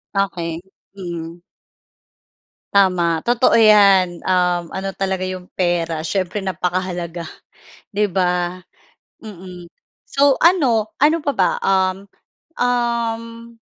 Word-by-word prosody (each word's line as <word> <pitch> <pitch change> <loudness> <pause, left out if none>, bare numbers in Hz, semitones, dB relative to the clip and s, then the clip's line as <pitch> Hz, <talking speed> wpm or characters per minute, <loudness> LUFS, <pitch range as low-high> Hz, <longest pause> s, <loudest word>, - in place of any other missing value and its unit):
Okey. 170 -4 -2 2.1
Tama, 175 -4 +2
totoo 240 +4 +2
yan, 200 -5 +5
um, 180 -2 +1
ano 195 0 -3
talaga 190 -1 -2
iyong 185 -1 -5
pera 170 -3 -1
siyempre 185 +4 -2
napakahalaga, 180 -2 -3 0.7
di 205 -2 +1
ba? 180 -1 0 0.6
Mm. 180 -4 -11 0.4
So 280 -1 +2
ano 250 - +2
ano 310 +3 +4
pa 290 -2 -2
ba? 185 -2 +2
Um 190 0 0 0.5
um 235 -2 -2
190 Hz, 90 wpm, -19 LUFS, 180-225 Hz, 2.1 s, yan